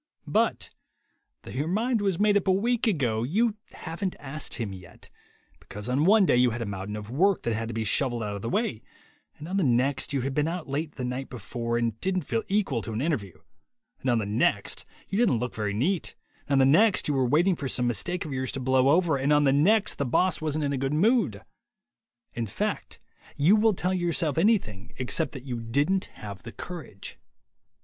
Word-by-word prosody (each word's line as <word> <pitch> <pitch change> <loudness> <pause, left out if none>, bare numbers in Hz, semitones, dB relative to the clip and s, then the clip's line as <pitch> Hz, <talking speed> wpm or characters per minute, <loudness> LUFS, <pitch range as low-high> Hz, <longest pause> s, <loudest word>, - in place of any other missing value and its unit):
But - - 0 0.7
though - - -9
your 145 +4 -2
mind 225 +5 0
was 195 -4 0
made 205 0 +4
up 200 -1 +1
a - - +5
week 235 +5 +1
ago, 125 - +1
you 210 - +1 0.2
haven't 180 +3 -4
asked 145 +1 -5
him 110 -5 -4
yet 90 -2 -13 0.5
because 105 +2 -8
on 135 +5 +1
one 205 +1 +6
day 125 - +3
you 125 0 +5
had 120 +1 -4
a - - -5
mountain 100 +1 -5
of 105 +1 -7
work 185 +8 +2
that 115 - 0
had 115 +1 -3
to 115 - -5
be 115 - -1
shovelled 120 0 +1
out 105 -1 -3
of 100 - -6
the 115 - -3
way, 205 - -1 0.6
and 150 - -9
on 190 +3 -2
the 195 - +2
next 130 +2 +1
you 140 -2 0
had 135 +2 -2
been 150 +2 +1
out 170 0 -4
late 145 +3 -3
the 125 - -4
night 125 +2 -4
before 115 0 -3
and 115 -2 -2
didn't 185 -2 0
feel 115 -4 -1
equal 195 - 0
to 110 - -6
an 110 - -2
interview, 125 - -2 0.6
and 130 - -2
on 120 - +3
the 110 - -1
next 100 -1 0 0.2
you 195 - -2
didn't 220 - +3
look 125 +2 -3
very 105 -2 -2
neat, 155 - -1 0.3
and 145 - -1
on - - +4
the 135 - +5
next 220 -3 +3
you 150 - +1
were 135 -1 +2
waiting 170 +8 +3
for 140 - -4
some 125 - +2
mistake 145 - -1
of 150 - -5
yours 130 -1 -2
to 135 - -4
"blow 130 +1 +3
over," 160 -1 +3
and 135 +2 0
on 150 0 +5
the 135 -2 +4
next 200 +9 +3
the - - +2
boss 155 +6 +1
wasn't 155 -1 -1
in 140 - -1
a 135 - -2
good 135 +2 -1
mood. 195 - +2 0.9
In 115 -1 -3
fact, - - -3 0.4
you 160 +9 +5
will 220 -1 +3
tell 180 +1 -1
yourself 170 -4 0
anything 165 - +1
except 130 +5 -1
that 135 -2 -9
you 125 -3 -4
didn't 145 +12 +1
have 100 -2 -8
the 115 - -9
courage. 160 - -8
140 Hz, 220 wpm, -27 LUFS, 120-180 Hz, 0.9 s, one